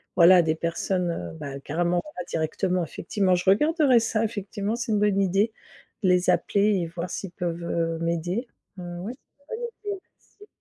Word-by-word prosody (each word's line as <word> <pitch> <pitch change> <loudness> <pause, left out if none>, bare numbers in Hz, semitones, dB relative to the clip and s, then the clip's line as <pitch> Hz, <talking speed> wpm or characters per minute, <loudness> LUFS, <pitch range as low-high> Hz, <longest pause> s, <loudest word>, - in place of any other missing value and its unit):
voilà 175 +1 +8
des 160 -1 +1
personnes, 170 +2 -1
heu, 85 - -5
bah, 140 -1 -6
carrément 170 +5 0
on 175 - -3
va - - -2
directement 180 +3 0
effectivement, 185 +3 0
je 180 +1 -3
regarderai 290 - +4
ça, 225 -1 0
effectivement 205 0 -3
c'est 235 -1 -3
une 210 - +2
bonne 205 -1 +3
idée, 195 +4 +2 0.5
de 185 - +4
les 180 0 +3
appeler 205 +1 +2
et 170 - -2
voir 170 +2 -5
s'ils 195 - -5
peuvent, 175 -1 -3
heu, 165 -1 -1
m'aider. 175 +8 -1 0.3
Mmh 175 -1 -6
oui, 215 +6 -4 0.2
c'est 285 +10 -8
une 460 - -7
bonne 475 - -3 0.3
idée, 380 - -13 0.4
merci. 415 - -14
180 Hz, 190 wpm, -26 LUFS, 170-210 Hz, 0.5 s, voilà